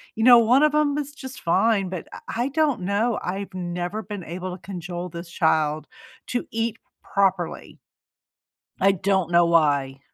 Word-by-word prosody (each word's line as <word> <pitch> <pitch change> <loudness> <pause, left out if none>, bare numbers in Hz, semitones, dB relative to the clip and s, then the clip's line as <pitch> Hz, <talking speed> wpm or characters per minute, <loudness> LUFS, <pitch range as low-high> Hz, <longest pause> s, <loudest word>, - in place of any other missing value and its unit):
you 220 - -1
know, 240 0 +9
one 245 +5 +4
of 305 -1 +3
'em 295 -1 +2
is 290 -1 -3
just 265 -2 -9
fine," 195 +2 +2
but 185 -2 -6
I - - -8 0.3
I - - 0
don't 290 -5 +1
know, 205 +5 0
I've 195 +2 -4
never 180 +3 -4
been 205 -1 -7
able 180 +2 -5
to - - -27
cajole 175 0 -5
this 170 +1 -8
child 155 -2 +1 0.4
to 245 - -3
eat 225 0 -2 0.3
properly. 190 -3 -1 1.0
I 195 +1 +6
don't 190 -2 0
know 175 0 +5
why. 145 -5 +2
190 Hz, 165 wpm, -24 LUFS, 175-230 Hz, 1.0 s, know